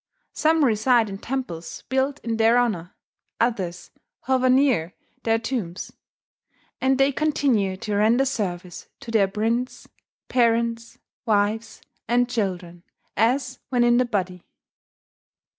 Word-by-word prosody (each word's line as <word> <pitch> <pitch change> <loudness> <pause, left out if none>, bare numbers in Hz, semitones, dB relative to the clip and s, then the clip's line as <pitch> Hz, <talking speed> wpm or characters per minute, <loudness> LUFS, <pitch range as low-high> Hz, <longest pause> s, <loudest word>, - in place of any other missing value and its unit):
Some 315 -1 +3
reside 230 0 +3
in 195 - -7
temples 225 -12 -5
built 265 +2 0
in 230 -1 -2
their 225 +2 +4
honour; 205 -8 -1 0.4
others 190 -7 -2 0.3
hover 255 -1 +1
near 255 - +2 0.3
their 225 0 +2
tombs; 225 -7 -4 0.9
and 265 0 +2
they 275 +1 +3
continue 260 -10 +1
to 210 +2 -4
render 225 +6 +3
service 180 -8 -4
to 230 - -8
their 210 -4 +3
prince, 225 +5 -2 0.4
parents, 230 -1 +1 0.3
wives, 215 +1 0 0.2
and 245 +1 +2
children, 185 -7 -3 0.3
as 255 +3 +1
when 245 -2 +2
in 240 0 +4
the 250 - +3
body." 185 -6 -3
230 Hz, 120 wpm, -23 LUFS, 200-255 Hz, 0.9 s, their